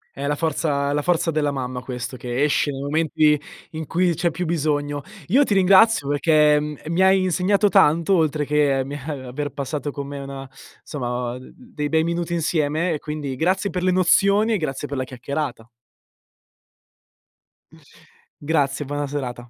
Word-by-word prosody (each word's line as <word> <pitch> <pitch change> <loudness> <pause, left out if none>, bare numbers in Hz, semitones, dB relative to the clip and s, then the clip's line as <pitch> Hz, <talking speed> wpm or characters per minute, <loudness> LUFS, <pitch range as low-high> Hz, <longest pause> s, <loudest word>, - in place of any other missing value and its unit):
È 140 +1 -4
la 145 - 0
forza 145 -2 -1
è - - 0
la 145 - 0
forza 170 +1 +1
della 150 -2 0
mamma 130 -2 -4
questo 125 0 -6
che 125 +2 -2
esce 150 0 +2
nei 135 -1 -4
momenti 150 0 +2 0.3
in 160 -1 -6
cui 175 0 +1
c'è 170 +2 0
più 175 +2 -4
bisogno. 145 -3 -1 0.3
Io 265 +9 +5
ti 210 - 0
ringrazio 195 -2 +5
perché, 150 +1 +4
mhmm, 150 0 -5
mi 170 +3 +1
hai 190 0 +5
insegnato 185 +3 +2
tanto 170 -2 +4
oltre 155 -2 +1
che, 145 -2 +2
mi, 140 - -7
eh 145 +2 -5
aver 145 +4 -4
passato 145 +1 -4
con 140 0 -6
me 140 0 -7 0.6
insomma 125 -3 -4
d 130 - -13
d 250 -1 -19
dei 150 -1 -2
bei 160 0 +2
minuti 170 0 -2
insieme 160 0 0
e 150 - -3
quindi 150 -3 -5
grazie 185 +7 0
per 180 - -3
le 185 - +2
nozioni 200 +4 +3
e - - +2
grazie 145 -4 -4
per 140 - -5
la 130 - -1
chiacchierata. 130 -1 -5 2.7
Grazie, 145 -2 0
buona 145 +1 -3
serata. 125 -4 -5
150 Hz, 170 wpm, -22 LUFS, 140-170 Hz, 2.7 s, Io